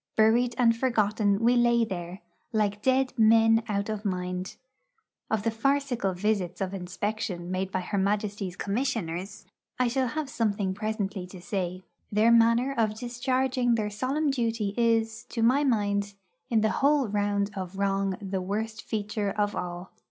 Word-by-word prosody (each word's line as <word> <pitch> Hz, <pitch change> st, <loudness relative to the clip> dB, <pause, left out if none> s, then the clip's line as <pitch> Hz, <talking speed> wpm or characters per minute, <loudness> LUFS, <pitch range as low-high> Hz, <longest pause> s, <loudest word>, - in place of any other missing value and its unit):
Buried 235 Hz, +3 st, +3 dB
and 235 Hz, -2 st, +4 dB
forgotten 215 Hz, -4 st, +1 dB
we 240 Hz, +2 st, +4 dB
lay 235 Hz, -1 st, +4 dB
there, 180 Hz, -1 st, -6 dB, 0.3 s
like 210 Hz, -2 st, 0 dB
dead 260 Hz, +1 st, +2 dB
men 225 Hz, 0 st, +5 dB
out 200 Hz, -1 st, -1 dB
of 215 Hz, -1 st, -4 dB
mind. 180 Hz, -1 st, -3 dB, 0.7 s
Of 220 Hz, -2 st, 0 dB
the 230 Hz, -, +1 dB
farcical 245 Hz, -4 st, 0 dB
visits 195 Hz, -2 st, -1 dB
of 195 Hz, -1 st, -2 dB
inspection 185 Hz, -1 st, -4 dB
made 190 Hz, +1 st, -2 dB
by 185 Hz, -, -1 dB
her 200 Hz, +2 st, -2 dB
Majesty's 200 Hz, -1 st, -1 dB
Commissioners 200 Hz, -5 st, -3 dB, 0.3 s
I 250 Hz, -, +2 dB
shall 260 Hz, +1 st, 0 dB
have 300 Hz, +4 st, -3 dB
something 205 Hz, -6 st, -1 dB
presently 205 Hz, -2 st, -3 dB
to 185 Hz, 0 st, -11 dB
say. 185 Hz, 0 st, -3 dB, 0.3 s
Their 215 Hz, +3 st, +4 dB
manner 235 Hz, +3 st, +4 dB
of 215 Hz, -2 st, 0 dB
discharging 250 Hz, +1 st, 0 dB
their 210 Hz, -2 st, -1 dB
solemn 275 Hz, +7 st, 0 dB
duty 225 Hz, -5 st, -1 dB
is, 225 Hz, -2 st, +1 dB
to 230 Hz, -, -3 dB
my 260 Hz, +5 st, +4 dB
mind, 205 Hz, -5 st, 0 dB, 0.3 s
in 225 Hz, -2 st, +3 dB
the 220 Hz, 0 st, +2 dB
whole 285 Hz, -2 st, +3 dB
round 205 Hz, 0 st, 0 dB
of 190 Hz, 0 st, -6 dB
wrong 195 Hz, -1 st, 0 dB
the 195 Hz, -1 st, -3 dB
worst 215 Hz, +3 st, -3 dB
feature 210 Hz, -1 st, -2 dB
of 205 Hz, 0 st, -1 dB
all. 175 Hz, +1 st, -5 dB
215 Hz, 155 wpm, -27 LUFS, 195-235 Hz, 0.7 s, men